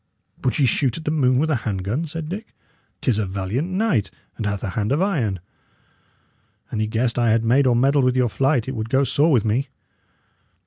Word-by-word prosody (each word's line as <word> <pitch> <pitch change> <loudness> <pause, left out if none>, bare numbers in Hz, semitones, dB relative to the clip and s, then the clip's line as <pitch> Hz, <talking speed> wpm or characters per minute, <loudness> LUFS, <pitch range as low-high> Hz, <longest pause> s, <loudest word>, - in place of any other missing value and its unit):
"Would 130 - 0
ye 145 - +3
shoot 125 0 +1
at 160 - -9
the 150 - 0
moon 130 -5 +2
with 155 +4 +1
a 140 - +2
hand 100 -5 -3
gun?" 120 - -2
said 160 0 -5
Dick. 205 +6 -7 0.5
"'Tis 120 -5 +1
a 105 - -1
valiant 100 - -2
knight, 185 - 0 0.3
and 110 - -3
hath 100 -1 -3
a 105 - -2
hand 105 +2 -2
of 145 - +2
iron. 135 - 0 1.3
An 110 - -2
he 110 - 0
guessed 115 +2 0
I 120 -1 +3
had 115 +1 +2
made 130 +4 +3
or 125 - +3
meddled 135 +2 +3
with 125 0 +2
your 125 -1 +3
flight, 135 +1 +1
it 130 - -4
would 110 0 -4
go 135 +3 +3
sore 145 +4 +2
with 120 -7 +3
me." 115 +6 0
125 Hz, 220 wpm, -22 LUFS, 110-145 Hz, 1.3 s, ye